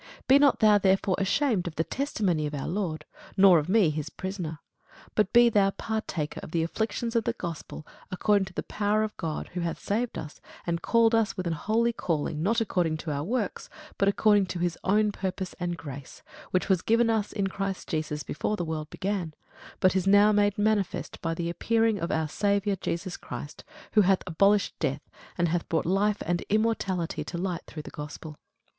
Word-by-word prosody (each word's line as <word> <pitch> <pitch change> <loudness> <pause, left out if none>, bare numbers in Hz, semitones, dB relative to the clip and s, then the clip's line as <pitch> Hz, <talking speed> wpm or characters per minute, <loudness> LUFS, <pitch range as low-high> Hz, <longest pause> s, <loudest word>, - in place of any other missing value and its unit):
Be 270 +2 +7
not 285 -3 +4
thou 210 -1 +6
therefore 190 0 +2
ashamed 200 -1 +1
of 165 - -6
the 160 - +1
testimony 190 - -1
of 150 - -5
our 140 - -4
Lord, 175 -4 -3 0.3
nor 190 -3 +7
of 150 +3 -5
me 195 -6 +4
his 150 -1 -4
prisoner: 185 -5 -5 0.6
but 210 -2 +1
be 240 0 +7
thou 205 -4 +4
partaker 195 -8 -3
of - - -9
the 165 0 0
afflictions 225 +6 -2
of 230 - +3
the - - 0
gospel 165 -3 -7 0.2
according 200 +1 +2
to 190 - -12
the - - -3
power 210 +1 0
of 215 - -4
God; 160 -3 -4
who 180 - -5
hath 170 -1 -2
saved 230 +4 -2
us, 150 - -8 0.2
and 170 -1 -1
called 230 -1 +3
us 225 -2 +2
with 185 - -3
an 170 - 0
holy 225 +8 +1
calling, 155 -6 -2
not 225 +7 +2
according 175 -7 0
to 155 0 -5
our 145 0 -2
works, 215 +2 -2 0.3
but 195 - +3
according 205 -1 +4
to 180 - -4
his 175 -1 -1
own 210 +2 +3
purpose 190 -1 -4
and 175 -1 -2
grace, 140 -4 -9 0.3
which 185 - 0
was 190 -4 +2
given 230 +1 +3
us 215 -2 0
in 200 -2 -1
Christ 195 0 -3
Jesus 150 -1 -2
before 210 +8 -2
the 175 - -2
world 155 -1 -4
began, 185 -5 -3 0.4
but 185 0 +3
is 190 0 +1
now 205 +2 +6
made 205 -1 +2
manifest 205 -2 -1
by 165 -1 -1
the 170 0 -3
appearing 225 +4 +1
of 170 - -2
our 160 0 0
Saviour 200 +3 +1
Jesus 180 0 -4
Christ, 125 +4 -8 0.3
who 215 - +5
hath 190 -1 +3
abolished 195 +4 +3
death, 145 -2 -2 0.3
and 170 -2 +2
hath 175 +1 -2
brought 165 - 0
life 200 +4 +1
and 175 +1 0
immortality 205 -5 0
to 175 - -5
light 180 -1 -2
through 155 - -8
the - - -10
gospel. 150 0 -8
190 Hz, 200 wpm, -27 LUFS, 165-210 Hz, 0.6 s, Be